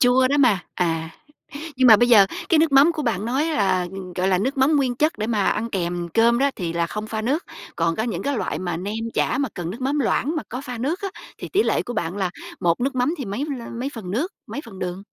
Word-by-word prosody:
chua 255 +1 +4
đó 285 - +2
mà. 235 -9 +4 0.2
À. 165 -2 -1 0.7
Nhưng 260 -1 +4
mà 220 - +10
bây 240 +3 +3
giờ 205 -5 +7 0.2
cái 330 - +4
nước 315 -2 +3
mắm 280 +5 +6
của 310 -2 -4
bạn 215 -5 -1
nói 265 +7 0
là, 195 - +1 0.3
gọi 185 +1 +1
là, 185 -1 +3
nước 265 +7 -1
mắm 290 +3 +4
nguyên 260 -3 +1
chất 305 -1 +1
để 215 - -1
mà 210 -4 +1
ăn 225 +2 0
kèm 175 -2 -2
cơm 235 +1 +4
đó 280 +1 +3
thì 170 -3 -3
là 170 0 0
không 210 +4 -5
pha 220 0 -3
nước, 280 +9 0 0.3
còn 165 0 +1
có 220 - 0
những 220 -7 -3
cái 280 -2 -1
loại - - -2
mà 175 -3 -3
nem 200 +4 -4 0.2
chả - - +1
mà 280 -3 0
cần 175 -2 -4
nước 235 +7 -8
mắm 275 +3 0
loãng 290 +4 0
mà 305 - -1
có 250 +3 -5
pha 250 -4 -7
nước 300 - -2
á 395 - -1 0.3
thì - - -7
tỷ 405 +3 +2
lệ - - +1
của 245 - -6
bạn 180 -4 -3
là 190 -3 -1 0.3
một 170 +4 +1
nước 270 +2 0
mắm 255 +6 +1
thì 270 - -3
mấy 205 +8 -3
lơ 230 - -8
mấy 245 +4 -3
phần 205 -6 -7
nước, 290 - -1
mấy 290 - -5
phần 200 -5 -11
đường? 180 +1 -4
235 Hz, 270 wpm, -23 LUFS, 190-275 Hz, 0.7 s, mà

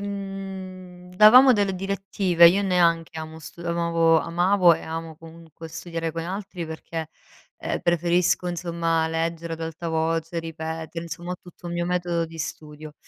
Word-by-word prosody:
mhmm, 190 -2 -7
davamo 250 +6 +8
delle 200 -4 +1
direttive, 190 -2 +3
io 195 +4 +2
neanche 170 -4 +1
amo 160 0 -8
stu 160 - -12
amavo 170 -1 +2
amavo 175 +1 +3
e 160 - -8
amo 160 0 -6
comunque 165 0 -12
studiare 165 0 -5
con 165 0 -4
altri 185 0 -5
perché, 160 0 -6 0.5
ehm, - - -3
preferisco 175 +1 +1
insomma 170 -2 -1
leggere 165 0 -2
ad 165 - -12
alta 165 +1 -5
voce, 165 +1 -1
ripetere, 160 0 -5
insomma, 170 +2 -6
ho - - -5
tutto 175 0 -13
un 170 - -5
mio 175 0 -1
metodo 175 -1 -1
di 165 0 -12
studio. 155 -1 -7
170 Hz, 150 wpm, -24 LUFS, 165-180 Hz, 0.5 s, davamo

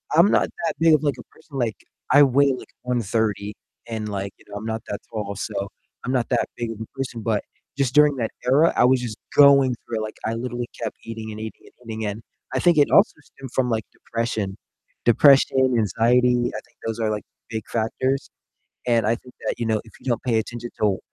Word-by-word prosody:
I'm 170 +5 +7
not - - +3 0.2
that - - -1
big 165 0 +5
of, 150 - 0
like, 145 -2 +1
a - - -9
person, 140 -4 -11
like, 115 -4 0 0.4
I 145 +3 +8
weigh, 140 +1 +4
like, 130 - -8 0.2
130 110 -4 -1 0.3
and, 110 -2 -4
like, 100 -1 -3
you - - -22
know, 100 - -9
I'm 105 - -7
not 110 0 -3
that 100 - -4
tall, 105 -3 -4
so 100 0 -3 0.4
I'm 125 - -1
not 125 -3 0
that - - +1
big 120 -1 -3
of 110 - -8
a - - -4
person, 125 -4 -4
but 110 -2 0 0.3
just 135 -3 0
during 150 -1 +6
that 115 -3 -1 0.2
era, 145 +6 +4
I - - +5
was 130 0 +4
just 115 -3 -5 0.2
going 140 -3 +7
through 115 -2 -3
it, - - -2
like, 110 - -6
I 115 - -1
literally 120 0 -4
kept 115 -2 -4
eating 110 -1 -6
and 105 - -7
eating 110 0 -8 0.2
and 115 -2 -8
eating, 110 0 -3
and 105 +2 -4 0.3
I - - +1
think 175 -3 +4
it 145 - +4
also - - +6
stemmed 135 -2 -12
from, 130 -2 +1
like, 110 -2 -1
depression. 110 -4 -3 0.5
Depression, 135 +3 +6 0.2
anxiety, 120 +4 +3 0.2
I - - -3
think - - -31
those 115 0 -3
are, 110 -1 +1
like, 105 -1 -3 0.3
big 110 -2 -5
factors, 130 +4 -1 0.6
and 115 -3 +3
I 115 - +3
think 125 +1 -16
that, - - +1
you 120 - -1
know, 110 -1 +1
if 110 - -17
you - - -18
don't 120 - 0
pay 120 -3 +2
attention 120 +2 -4
to - - -41
w 100 -3 +2
115 Hz, 225 wpm, -23 LUFS, 110-130 Hz, 0.6 s, I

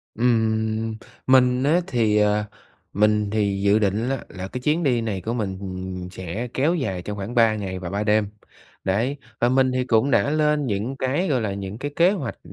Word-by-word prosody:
Ừm, 110 -1 +1 0.3
mình 130 0 +4
á 165 +5 +3
thì, 110 -4 +2
à 105 0 +2 0.5
mình 105 0 +2
thì 100 -2 0
dự 100 +2 +4
định 105 +4 0
á 135 - 0
là 95 0 -6
cái 125 - -5
chuyến 155 +6 +1
đi 125 -5 +2
này 100 -5 -3
của 115 +5 -3
mình 100 -5 -2 0.5
sẽ 95 +6 -5
kéo 155 +7 +2
dài 95 - -2
trong 105 +2 -6
khoảng 100 +6 -5
3 115 -2 +4
ngày 95 -3 -4
và 90 - -5
3 100 +3 -2
đêm. 105 -1 +2 0.5
Đấy, 115 +9 0 0.2
và 120 - +4
mình 130 0 +3
thì 130 0 0
cũng 120 +3 +2
đã 140 - +3
lên 150 -1 +2
những 115 +5 -2
cái, 140 +9 0
gọi 130 -6 +1
là, 100 -3 -2
những 100 +1 -6
cái 145 +3 -4
kế 175 +3 +5
hoạch 150 - -4
110 Hz, 200 wpm, -23 LUFS, 105-130 Hz, 0.5 s, kế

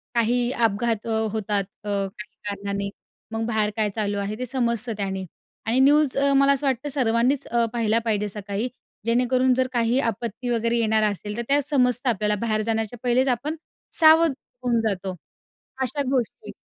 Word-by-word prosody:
काही 240 +2 +2
अपघात 230 -1 0 0.2
होतात 210 -2 0 0.2
अ, 210 - -5
काही 200 +1 -4
कारणाने 200 0 -3 0.4
मग 225 0 -2
बाहेर 220 -2 +1
काय 215 -1 +2
चालू 205 -2 -1
आहे 200 +1 -3
ते 255 - -2
समजतं 235 -2 0
त्याने. 190 -2 -3 0.4
आणि 235 +4 +2
न्यूज 290 0 +4
अ, 280 0 +3
मला 275 0 +5
असं 275 +1 0
वाटतं 265 +2 -1
सर्वांनीच 255 0 +1
अ, 235 0 +2
पाहिला 230 -1 +2
पाहिजे 210 -2 0
सकाळी 205 +3 -3 0.4
जेणेकरून 250 +2 +3
जर 255 0 +1
काही 235 +2 +2
आपत्ती 230 0 -3
वगैरे 235 0 +1
येणार 220 -1 +2
असेल, 205 +2 -6
तर - - -1
त्या 285 +1 +3
समजतं 255 -3 +2
आपल्याला. 210 -2 +1
बाहेर 215 -2 0
जाण्याच्या 225 +1 -2
पहिलेच 250 +2 +2
आपण 265 +5 -1 0.4
सावध 320 -1 +7 0.3
होऊन 240 -2 +2
जातो 190 -2 -3 0.7
अशा 265 +3 0
गोष्टी. 260 - -2
235 Hz, 160 wpm, -24 LUFS, 210-255 Hz, 0.7 s, सावध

